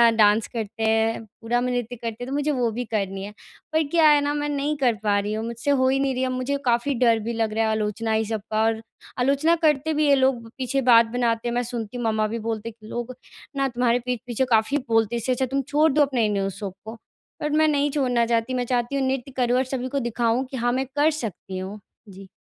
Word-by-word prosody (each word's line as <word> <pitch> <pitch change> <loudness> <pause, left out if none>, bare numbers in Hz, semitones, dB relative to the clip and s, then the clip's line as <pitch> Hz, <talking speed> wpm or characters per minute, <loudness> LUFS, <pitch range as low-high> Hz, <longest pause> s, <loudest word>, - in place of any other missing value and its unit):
Dance 210 0 +4
करते 225 -1 -5
हैं 225 +1 +2 0.2
,पूरा 235 +2 0
में 250 - -1
नृत्य 245 -1 -2
करते 230 0 -6
हैं। - - -6
तो 265 - -4
मुझे 290 +1 0
वो 250 -4 +1
भी 240 +3 -3
करनी 195 -3 -3
है। 205 - -7 0.4
पर 315 - +3
क्या 330 -2 +5
है 295 -1 +6
न 290 +1 0
मैं 295 0 -2
नहीं 290 +1 -1
कर 255 -4 +2
पा 205 -1 +2
रही 205 +1 -3
हूँ 220 +1 -3
मुझसे 235 +4 -2
हो 260 -2 +3
ही 270 +1 +2
नहीं 275 -1 +1
रही 255 +1 -1
है, 260 - 0
मुझे 255 +2 -1
काफ़ी 240 +3 +2
डर 235 -2 +3
भी 230 +2 -4
लग 225 -2 -1
रहा 225 +1 +1
है - - +1
आलोचनाएँ 220 +1 0
सब 220 -1 -3
का 215 0 +1
और 225 0 +1 0.4
आलोचना 280 +6 +3
करते 310 0 +2
भी 300 0 +2
है 280 - +6
लोग 260 -4 +1
पीछे 270 +1 -1
बात 230 0 +8
बनाते 240 -1 0
हैं। 235 - -1
मैं 245 - +1
सुनती 235 -1 -5
हूँ 240 - -3
मम्मा 215 -1 +1
भी 230 +2 -4
बोलते 225 0 -3
हैं 230 - -13
कि 215 - -12
लोग 240 +2 -5 0.4
न 275 0 +2
तुम्हारे 245 0 +1
पीठ 250 -2 -1
पीछे 245 +2 0
काफ़ी 225 +5 +3
बोलते 225 0 +2
इससे 235 +2 -1
अच्छा 255 +1 +1
तुम 275 - +2
छोड़ 305 +2 +3
दो 300 - +3
अपने 260 -6 +2
न्यू 195 -1 0
शौक 195 -3 -5
को। 220 - -6 0.5
बट 300 - -1
मैं 310 - +5
नहीं 290 -1 +2
छोड़ना 250 -5 +1
चाहती 230 +2 0
मैं 250 -1 -1
चाहती 245 +2 -1
हूँ 270 -1 +1
नृत्य 265 0 -2
करूँ 245 0 +2
और 260 - +3
सभी 255 0 -2
को 280 - +2
दिखाऊँ 235 +2 0
कि 265 - -4
हाँ 240 0 +1
मैं 260 +2 0
कर 295 +2 +4
सकती 195 -3 -6
हूँ। 190 +3 -6 0.3
जी 195 0 -12
240 Hz, 255 wpm, -24 LUFS, 225-265 Hz, 0.5 s, बात